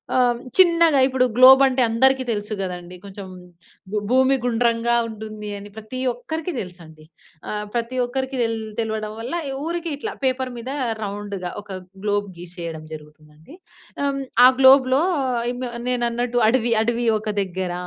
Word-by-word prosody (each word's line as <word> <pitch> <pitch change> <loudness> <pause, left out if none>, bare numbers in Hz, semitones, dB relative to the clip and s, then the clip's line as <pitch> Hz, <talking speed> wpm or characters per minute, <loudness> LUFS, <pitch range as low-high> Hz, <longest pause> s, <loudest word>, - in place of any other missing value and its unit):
ఆహ్, 250 -1 +4
హ్మ్. - - -7 0.2
చిన్నగా 335 -5 +5
ఇప్పుడు 260 -1 +2
గ్లోబంటే 265 0 +7
అందరికి 260 +3 +3
తెలుసు 210 -1 -2
గదండీ 180 -1 -6
కొంచెం, 200 0 -9 0.7
భూ 215 - -1
భూమి 260 +2 +4
గుండ్రంగా 235 -1 +1
ఉంటుంది 215 -1 -8
అని 205 +1 -10
ప్రతి 220 +4 -7
ఒక్కరికి 315 +8 -5
దెలుసండి. 165 -4 -10 0.5
ఆహ్, 210 0 -3
ప్రతి 240 +2 -2
ఒక్కరికి 265 +2 -3
తెల్ 230 -1 0 0.2
తెలవడం 220 -1 -2
వల్ల 235 +6 -5 0.2
ఈ - - -4
ఊరికి 340 +1 -3
ఇట్లా 280 - -5
పేపరు 260 0 0
మీద 235 +2 -7 0.3
రౌండ్‌గా 200 -3 -5
ఒక 200 -2 -8 0.3
గ్లోబ్ 205 -1 0
గీసేయడం 170 -2 -8
జరుగుతుందండి. 150 - -14 0.5
హ్మ్. 280 -1 -1 0.2
ఆ - - +11
గ్లోబ్‌లో 265 0 +6 0.5
ఇమ్ 250 +1 -7 0.3
నేనన్నట్టు 240 0 0
అడవి 240 0 +2
అడవి 240 +1 -1
ఒక 215 - -5
దగ్గర, 185 -1 -3
230 Hz, 140 wpm, -22 LUFS, 205-260 Hz, 0.7 s, ఆ